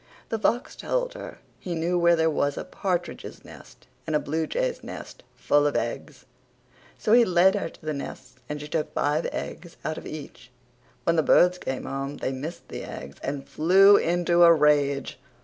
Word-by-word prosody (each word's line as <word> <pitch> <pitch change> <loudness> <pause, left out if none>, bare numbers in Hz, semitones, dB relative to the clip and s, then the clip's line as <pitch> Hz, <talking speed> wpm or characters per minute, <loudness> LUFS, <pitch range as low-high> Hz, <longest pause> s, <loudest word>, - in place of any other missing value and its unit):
The 225 - -2
fox 245 +7 0
told - - -2
her - - -9 0.2
he 175 -2 -4
knew 170 +2 0
where 170 0 +5
there 160 -1 +2
was 145 -1 0
a - - -3
partridges 180 -3 -4
nest - - -15 0.2
and 155 - 0
a - - +4
bluejays 470 - -2
nest - - -9
full 145 0 +2
of 145 - -2
eggs. 130 +4 -4 0.7
So 215 - +1
he 240 0 +7
led 185 -1 +4
her 200 -5 -2
to 160 - -18
the 155 - -1
nests 130 -2 -7 0.2
and 150 0 -4
she 150 - -7
took 155 0 -3
five 150 +3 +1
eggs 175 -2 -7
out 155 - -2
of - - -10
each. 145 -5 -9 0.5
When 170 0 +1
the - - +5
birds 180 +3 +4
came 130 -5 -4
home 135 +1 -4
they - - -2
missed 155 +6 -7
the - - -6
eggs 70 +1 -9
and 140 0 -4
flew 195 +5 +6
into 175 -1 +2
a 170 -1 +9
rage. 145 -4 +2
160 Hz, 185 wpm, -25 LUFS, 145-180 Hz, 0.7 s, a